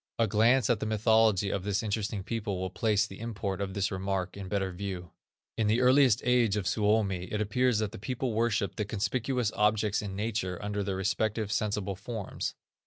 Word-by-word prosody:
A 115 - +3
glance 115 +3 +3
at 120 -4 +2
the 110 - -2
mythology 110 -2 +3
of 100 - -2
this 100 +1 -1
interesting 105 -2 -2
people 105 -3 -3
will 95 -1 -3
place 105 +2 +2
the 95 -2 -10
import 100 -4 -3
of 95 -1 -3
this 100 +1 0
remark 95 -1 -2
in 100 -1 -7
better 95 -1 -1
view. 90 -2 -6 0.5
In 110 - +2
the 110 +3 +3
earliest 130 -2 +5
age 120 -4 +3
of 100 - -2
Suomi, 105 -3 +1
it 105 - -3
appears 120 +3 +2
that 105 -1 -1
the - - -9
people 125 +3 -2
worshiped 110 -4 0
the 105 - -1
conspicuous 115 +3 -1
objects 105 0 +2
in 100 -2 -5
nature 100 -3 -2
under 105 0 -3
their 95 -1 -2
respective, 105 +2 -1
sensible 105 -1 -1
forms. 105 +1 -5
105 Hz, 190 wpm, -29 LUFS, 100-110 Hz, 0.5 s, earliest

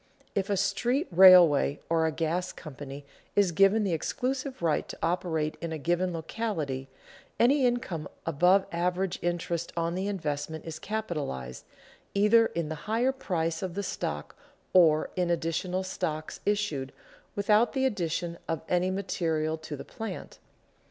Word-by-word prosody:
If 195 0 -1
a 200 - +1
street 245 - +1
railway 175 -6 +7
or 165 -1 +2
a - - 0
gas 165 +3 -1
company 140 -2 -9 0.3
is 200 -3 +4
given 195 +5 +4
the 190 -4 0
exclusive 260 - -2
right 160 -2 +1
to - - -7
operate 165 -3 -1
in 170 -1 -4
a 160 - -3
given 175 +4 0
locality, 160 -7 -3 0.5
any 260 +2 +5
income 240 - -2 0.2
above 180 +5 +4
average 180 +2 -1
interest 170 -1 -2
on 165 0 0
the 190 +2 -2
investment 160 -5 -3
is 160 -1 -6
capitalized 150 - -4 0.5
either 220 +3 +5
in 170 -2 -3
the 155 +6 -7
higher 235 +4 +2
price 165 -11 -2
of 185 -2 -4
the 200 - -2
stock 75 - -4 0.4
or 160 -4 +5
in 180 -1 0
additional 170 +2 -1
stock 155 -4 -3
issued 200 -11 -1 0.4
without 210 +3 +3
the 265 -1 +1
addition 175 -6 -2
of 165 - -2
any 180 +1 +1
material 165 -5 -1
to 155 -1 -6
the 140 - -9
plant. 225 0 -7
175 Hz, 145 wpm, -28 LUFS, 160-200 Hz, 0.5 s, railway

